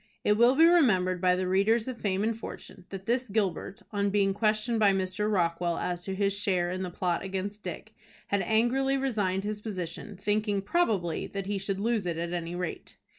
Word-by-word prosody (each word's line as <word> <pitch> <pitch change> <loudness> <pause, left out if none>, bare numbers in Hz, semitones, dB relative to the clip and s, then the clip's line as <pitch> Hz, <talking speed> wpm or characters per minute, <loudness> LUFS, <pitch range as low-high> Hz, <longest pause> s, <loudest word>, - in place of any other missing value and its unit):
It 210 - +4
will 240 +4 +5
be 325 +3 +7
remembered 190 - +4
by 180 -1 +4
the 185 0 -1
readers 215 +5 +2
of 255 -3 -6
"Fame 195 -1 0
and 225 +1 0
Fortune," 200 -4 -9
that 195 -1 -7
this 245 +2 0
Gilbert, 195 -2 -2
on 200 -1 0
being 195 -1 +2
questioned 215 +2 +1
by 205 -2 +5
Mr. 190 +2 -1
Rockwell 170 -2 0
as 175 -1 -2
to 190 - -3
his 200 0 +1
share 185 -4 0
in 185 +1 -3
the 185 - -3
plot 175 -1 -1
against 195 +2 -4
Dick, - - -7 0.4
had 200 -1 +1
angrily 250 +6 +2
resigned 205 -8 0
his 210 0 -4
position, 190 -1 -5
thinking, 205 0 0
probably, 200 - 0
that 195 -1 -5
he 200 0 -2
should 195 0 -2
lose 220 -2 0
it 170 -2 -2
at 170 +1 -3
any 170 0 -3
rate. 180 -1 -5
200 Hz, 200 wpm, -28 LUFS, 185-220 Hz, 0.4 s, be